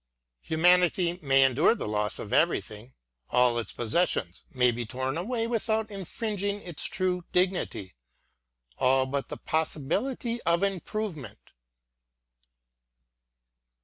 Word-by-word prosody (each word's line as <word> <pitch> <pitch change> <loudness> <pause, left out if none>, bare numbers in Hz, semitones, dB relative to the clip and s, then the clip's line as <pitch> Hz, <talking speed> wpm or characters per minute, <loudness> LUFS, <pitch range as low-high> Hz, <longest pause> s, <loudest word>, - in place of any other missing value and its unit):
Humanity 175 +1 +3
may 135 -2 +4
endure 135 - +4
the - - -5
loss 105 -1 -1
of - - -6
everything: 110 +4 0 0.3
all 125 -1 +3
its 115 - -5
possessions 115 - -1
may 125 -2 +3
be 120 +1 -4
torn 130 +4 -3
a 170 - -2
way 230 +1 -1
without 220 -1 -1
infringing 200 +1 -3
its 175 -4 -1
true 180 -1 -1
dignity; 180 - -1 0.4
— - - -40
all 130 +1 +3
but 140 +1 -3
the - - -6
possibility 205 - -2
of 170 +2 +1
improvement. 185 - -4
160 Hz, 115 wpm, -28 LUFS, 125-195 Hz, 0.4 s, may